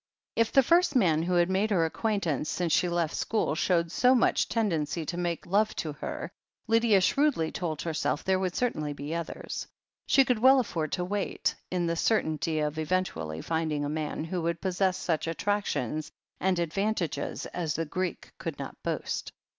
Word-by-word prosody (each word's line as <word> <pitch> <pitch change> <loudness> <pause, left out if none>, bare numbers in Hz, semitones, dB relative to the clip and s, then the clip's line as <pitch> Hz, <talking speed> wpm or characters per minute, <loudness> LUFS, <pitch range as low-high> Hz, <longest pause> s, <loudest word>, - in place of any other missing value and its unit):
If 230 -1 +2
the 270 - +6
first 340 +2 +3
man 170 -10 +4
who 180 +2 0
had 175 0 +4
made 190 +3 +1
her 175 -6 +3
acquaintance 165 - -1
since 175 -3 0
she 180 - +3
left 170 -2 0
school 220 -8 0
showed 170 +1 +1
so 255 +1 +4
much 245 - +2
tendency 165 -8 0
to 170 - -3
make 175 -1 -2
love 205 +4 +2
to 155 -2 -3
her, 150 - -5 0.3
Lydia 225 -3 +4
shrewdly 250 - +2
told 160 -4 -3
herself, 160 -2 -1
there 190 0 +2
would 185 -2 -2
certainly 155 -12 -1
be 145 +2 -5
others. 170 -1 -5 0.4
She 270 - +5
could 250 -4 +1
well 260 +3 +7
afford 165 - -2
to 180 - -1
wait, 200 +1 -1 0.2
in 180 -1 0
the 170 0 0
certainty 160 -5 +1
of 150 +1 -1
eventually 150 - -2
finding 160 -3 -1
a - - -2
man 155 0 -3
who 175 +2 -3
would 170 0 -1
possess 185 0 +1
such 165 -3 -1
attractions 165 - -1 0.3
and 190 -1 +1
advantages 175 +2 -1
as 165 -4 -3
the 165 - -1
Greek 180 +2 -4
could - - -4
not - - -7
boast. - - -3
175 Hz, 180 wpm, -28 LUFS, 160-205 Hz, 0.4 s, well